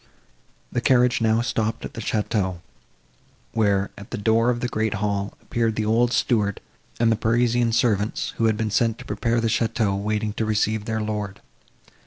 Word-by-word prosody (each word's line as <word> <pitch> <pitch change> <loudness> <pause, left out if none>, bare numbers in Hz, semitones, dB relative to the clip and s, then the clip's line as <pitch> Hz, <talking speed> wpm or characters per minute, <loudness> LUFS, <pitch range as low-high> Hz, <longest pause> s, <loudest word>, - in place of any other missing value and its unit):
The 120 - -1
carriage 125 -2 +3
now 110 0 +3
stopped 115 -2 -1
at - - -8
the 115 - -6
château, 100 -6 -1 0.9
where, 100 -3 +1
at 100 - -11
the - - -4
door 115 +3 +2
of 120 -1 0
the 125 - 0
great 110 -2 -1
hall, 100 -1 -2
appeared 115 -2 0
the 110 - -1
old 115 +3 +3
steward 110 -4 +1 0.4
and 115 -1 +4
the - - +3
Parisian 120 +1 +2
servants, 110 -3 0
who 115 - +2
had 110 -1 +2
been 110 -1 -1
sent 115 +1 +1
to - - -11
prepare 115 +3 0
the 115 - +1
château, 110 -3 +1
waiting 105 0 -1
to 110 - -2
receive 110 0 0
their 110 -1 -2
lord. 105 -2 -3
110 Hz, 180 wpm, -23 LUFS, 105-115 Hz, 0.9 s, and